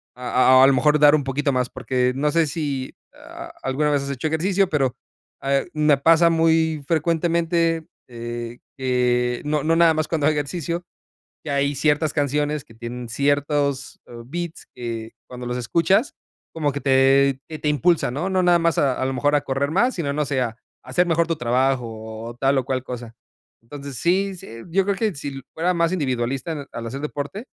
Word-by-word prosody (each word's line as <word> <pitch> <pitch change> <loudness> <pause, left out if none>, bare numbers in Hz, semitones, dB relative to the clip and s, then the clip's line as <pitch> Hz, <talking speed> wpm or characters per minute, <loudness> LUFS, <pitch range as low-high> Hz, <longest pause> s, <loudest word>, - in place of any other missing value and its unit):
a 130 +1 +4
a - - +8
a - - +8
lo 140 - +4
mejor 150 +3 +3
dar 150 0 +7
un 145 - 0
poquito 140 +2 -1
más. 125 -1 0
Porque, 125 -1 0
no 145 +3 +1
sé, 165 +1 +3
si 140 -3 -3 0.7
alguna 145 +3 0
vez 145 -1 +1
has 140 - -4
hecho 140 +4 -2
ejercicio, 185 +5 +1
pero, 135 -6 0 0.5
ah, 135 0 +1
me 150 -2 +3
pasa 165 +4 +5
muy 160 -2 +2
frecuentemente, 165 0 +1 0.2
eh, 120 0 -6 0.2
que 125 -2 +1
no 150 -1 0
no 165 +1 +2
nada 165 -1 +5
más 155 0 -1
cuando 155 -3 0
hago 155 - +3
ejercicio, 165 +4 -3 0.6
que 155 - -4
hay 140 0 +1
ciertas 150 +2 +1
canciones 145 0 0
que 115 - -17
tienen 120 +1 -7
ciertos, 145 +1 0
eh, - - -13
beats 170 +4 -6
que 115 -2 -6
cuando 125 0 -8
los 125 0 -3
escuchas, 180 - +1 0.4
como 150 -3 0
que 140 +1 -5
te 135 0 +4
que 155 -1 -7
te 150 - 0
impulsa, 160 +2 +2
¿no? 150 +9 -2
No 190 -1 +2
nada 175 -1 +5
más 165 -1 +1
a 135 -3 +1
a - - +1
lo 135 - -1
mejor 145 +3 +1
a 145 - +2
correr 140 0 -1
más, 240 +9 +2
sino 150 -5 -2
no 150 +1 0
sé, 135 -2 -1
a 115 -2 -3 0.3
hacer 130 +8 +1
mejor 170 0 +2
tu 165 - 0
trabajo, 125 +1 +1 0.4
o 120 - -9
tal 135 +2 +1
o 130 - -4
cual 130 -1 -2
cosa. 120 -3 -7 0.5
Entonces, 140 +2 -9
sí 190 - +1
sí, - - -12 0.2
yo 195 +4 +2
creo 200 - 0
que 215 -2 0
si 140 -1 -6
fuera 175 +3 0
más 170 0 +2
individualista 135 -1 -2
al 115 0 -6
hacer 135 +4 -6
deporte, 150 - -5
145 Hz, 195 wpm, -22 LUFS, 130-165 Hz, 0.7 s, a